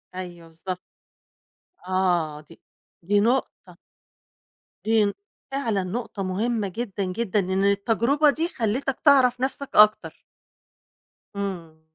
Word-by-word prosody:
أيوه 175 -2 -8
بالضبط، 180 +3 -7 1.1
آه، 175 -5 0
دي 160 +2 -18 0.4
دي 205 +4 +2
نقطة 245 +5 -1 1.1
دي 220 -1 +4
ن 200 - -1 0.4
فعلًا 230 -8 -1
نقطة 205 +1 -4
مهمة 210 +3 -1
جدًا، 200 0 -4
جدًا، 195 +2 -1
إن 190 0 0
التجربة 230 +9 +2
دي 320 +4 0
خلّيتك 255 +1 -2
تعرف 255 -3 +5
نفسك 270 +1 -3
أكتر. 210 0 +4 1.1
إمم. 175 -6 -5
205 Hz, 105 wpm, -24 LUFS, 185-240 Hz, 1.1 s, تعرف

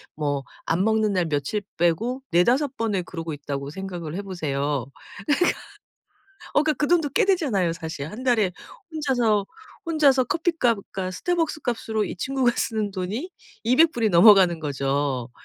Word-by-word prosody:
뭐 145 -2 -1 0.2
안 175 +3 +1
먹는 220 -1 +2
날 180 -2 +1
며칠 150 +6 -1 0.2
빼고 220 +11 0
4-5 255 - +2
번을 210 -5 -1
그러고 165 -2 -6
있다고 140 -1 -5
생각을 175 -2 -6
해 200 - -4
보세요. 145 - -2
그니까 140 - -20 1.4
어 295 - +5
그니까 310 0 +1
그 295 - +1
돈도 335 -4 +3
꽤 - - +4
되잖아요 270 - +1
사실. 160 -4 -6
1 230 +4 -8
달에 220 -8 +2 0.4
혼자서 245 -9 +1 0.4
혼자서 285 -6 +4
커피값과 235 - -1
스타벅스 325 - -1
값으로 225 -3 -1
이 - - -5
친구가 260 +4 +1
쓰는 215 -2 -1
돈이 205 - -4 0.3
200 305 +8 +4
불이 225 -3 +1
넘어가는 180 -2 +6
거죠. 135 -3 -1
205 Hz, 295 characters per minute, -24 LUFS, 165-255 Hz, 1.4 s, 넘어가는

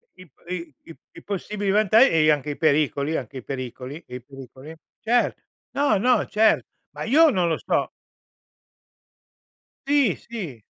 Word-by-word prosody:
I 185 - -14
p 160 - -28 0.2
i 170 -4 -8 0.2
i - - -12 0.2
i - - -12
possibili 200 0 -3
vanta 215 +1 +4
e 160 - +5
anche 150 0 -1
i 145 - -7
pericoli, 150 0 +1
anche 130 0 -7
i 130 - -8
pericoli, 130 +3 -7
e 125 - -9
i 125 - -7
pericoli. 135 +3 -12 0.2
Cer 240 +2 +1 0.4
no, 280 -6 +2
no, 245 +6 +2
cer 215 +2 +2 0.3
ma - - -5
io 315 +7 +5
non 185 -9 +1
lo 160 - 0
so. - - -1 2.0
Sì, 280 -8 +3
sì. 180 - -8
165 Hz, 155 wpm, -23 LUFS, 140-215 Hz, 2.0 s, e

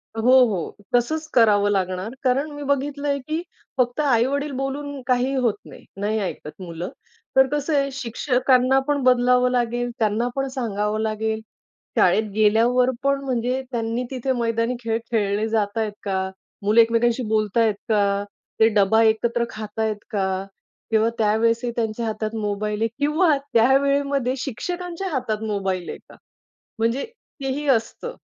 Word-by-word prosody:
हो, 225 - -2 0.2
हो. 190 -7 -3 0.2
तसंच 310 +6 0
करावं 205 -4 +4
लागणार, 185 +2 -1
कारण 270 +4 +1
मी 290 0 -7
बघितलं 285 +1 -1
आहे 280 0 +1
की 310 +5 -3 0.4
फक्त 245 +2 +1
आई-वडील 280 +2 +1
बोलून 275 +1 -4
काहीही 255 +2 +1
होत 240 -5 +1
नाही, - - -13 0.2
नाही 215 +2 0
ऐकत 185 -3 -6
मुलं. 175 0 -5 0.5
तर 265 0 +6
कसं 295 +2 -1
आहे, 275 0 +1
शिक्षकांना 255 +1 +2
पण 290 -1 +1
बदलावं 250 0 +4
लागेल, 245 0 0
त्यांना 220 +2 +1
पण 270 0 -1
सांगावं 215 -3 -1
लागेल. 220 0 -1 0.6
शाळेत 215 -1 +3
गेल्यावर 230 +4 +4
पण, 275 0 +1
म्हणजे 255 0 -1
त्यांनी 230 +1 -2
तिथे 260 0 -2
मैदानी 230 +1 0
खेळ 225 0 0
खेळले 210 -1 +1
जातायेत 215 0 0
का? 190 -1 -1 0.3
मुलं 215 +3 +6
एकमेकांशी 230 +2 +2
बोलतायेत 215 0 +2
का? 200 -2 +2 0.4
ते 220 - +7
डबा 210 +2 +4
एकत्र 230 +2 +2
खातायत 215 0 -3 0.2
का? 190 -2 -1 0.5
किंवा 220 +1 +3
त्यावेळेस 225 +2 +2
ही 240 - -1
त्यांच्या 230 0 -2
हातात 215 0 -3
मोबाईल 210 +1 -2
आहे 225 - +3
किंवा 300 +2 +3 0.2
त्या 235 +3 +5
वेळेमध्ये 280 -2 +1
शिक्षकांच्या 350 - -4
हातात 220 -6 -2
मोबाईल 190 -4 -2
आहे - - -5
का? - - -14 0.6
म्हणजे 230 +4 0 0.4
ते 270 - -2
ही 295 +2 -4
असतं 265 - 0
230 Hz, 145 wpm, -23 LUFS, 215-265 Hz, 0.6 s, ते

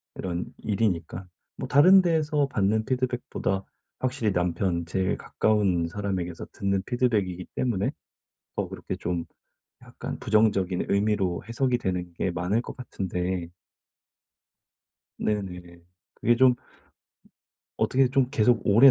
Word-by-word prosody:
이런 90 -2 -3
일이니까 95 -4 -1 0.3
뭐 130 - -4
다른 185 +8 +7
데에서 155 -4 +1
받는 110 -3 +1
피드백보다 125 -6 -1 0.4
확실히 120 -5 0
남편, 90 0 0
제일 95 +1 0
가까운 95 -6 +1
사람에게서 90 -3 -4
듣는 100 -1 0
피드백이기 105 -8 0
때문에 110 -6 0 0.7
더 - - -1
그렇게 - - -5
좀 85 -1 -2 0.6
약간 - - -7
부정적인 100 -4 +2
의미로 100 -3 +1
해석이 125 +1 +1
되는 90 -2 -3
게 90 - -1
많을 90 +6 0
것 - - -8
같은데 90 -7 -3 1.7
네네. 90 -4 -3 0.4
그게 120 - +3
좀 125 0 +5 1.2
어떻게 130 -1 +3
좀 135 -1 +2
계속 120 -3 +3
오래 115 +7 +8
100 Hz, 265 characters per minute, -26 LUFS, 90-125 Hz, 1.7 s, 오래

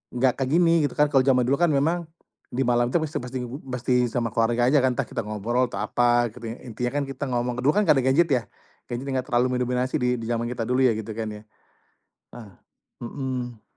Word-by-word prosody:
gak 125 0 +2
kayak 135 - 0
gini 165 -1 +4
gitu - - -11
kan 150 - +5
kalau 135 -2 +4
zaman 130 -2 +3
dulu 135 - +3
kan 175 -2 +3
memang, 160 +5 +1 0.5
di 130 +2 0
malam 120 0 +3
itu 170 - +2
pasti 155 0 -3
pasti 125 +1 -5 0.3
pasti 125 0 -1 0.2
sama 120 -1 -1
keluarga 120 +2 +2
aja 145 - +5
kan 130 - +3
entah - - -2
kita - - -4
ngobrol 115 +4 0
atau - - -4
apa 120 0 +2
gitu 120 +1 -11 0.2
intinya 125 +1 -3
kan - - -1
kita 135 - -5
ngomong 120 0 -1
dulu 140 - +5
kan 210 0 +2
gak - - +6
ada 130 - -1
gadget 140 +6 +3
ya? 125 -3 +2 0.5
Gadget 120 +3 -4
gak 130 0 -2
terlalu 125 +1 +2
mendominasi 125 +1 -1
di 125 -5 +1
di 115 - -6
zaman 120 0 -1
kita 120 -2 -3
dulu 125 +1 +2
ya 125 - +5
gitu 110 0 -5
kan 115 -1 -3
ya, 105 - -9 1.0
nah, 110 -5 -11 0.5
mhm. 125 -2 -5
125 Hz, 220 wpm, -24 LUFS, 120-135 Hz, 1.0 s, gak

